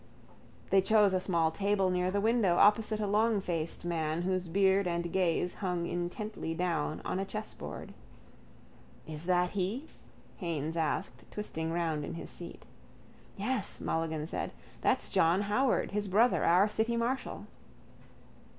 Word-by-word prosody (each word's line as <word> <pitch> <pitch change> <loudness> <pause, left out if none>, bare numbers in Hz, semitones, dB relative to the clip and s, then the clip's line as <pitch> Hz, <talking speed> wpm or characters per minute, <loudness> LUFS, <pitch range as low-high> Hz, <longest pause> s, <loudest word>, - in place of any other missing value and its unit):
They 195 - +6
chose 205 0 +4
a 185 - +2
small 170 -3 +1
table 195 +2 +1
near 180 0 +1
the 200 +2 0
window, 215 -4 +3
opposite 215 +2 +4
a 210 - 0
longfaced 200 -7 0
man 165 -1 -1
whose 185 -1 -1
beard 190 +2 +3
and 170 0 -2
gaze 180 -1 +1
hung 180 -3 -2
intently 175 0 -4
down 165 -3 -1
on 185 - -1
a - - 0
chessboard. 215 +2 -6 1.1
—Is 155 +1 -6
that 180 -1 +2
he? 205 +9 -2 0.5
Haines 165 -3 -3
asked, 165 +4 -2
twisting 165 -6 -4
round 165 -3 -1
in - - -5
his - - -7
seat. - - -9 0.7
—Yes, 210 0 -1
Mulligan 160 -2 -2
said. - - -4 0.3
That's - - +2
John 170 +4 +3
Howard, 240 +6 +1
his 205 0 -1
brother, 220 +6 +3
our 180 +4 +5
city 220 +2 0
marshal. 245 +3 -2
185 Hz, 140 wpm, -31 LUFS, 170-210 Hz, 1.1 s, They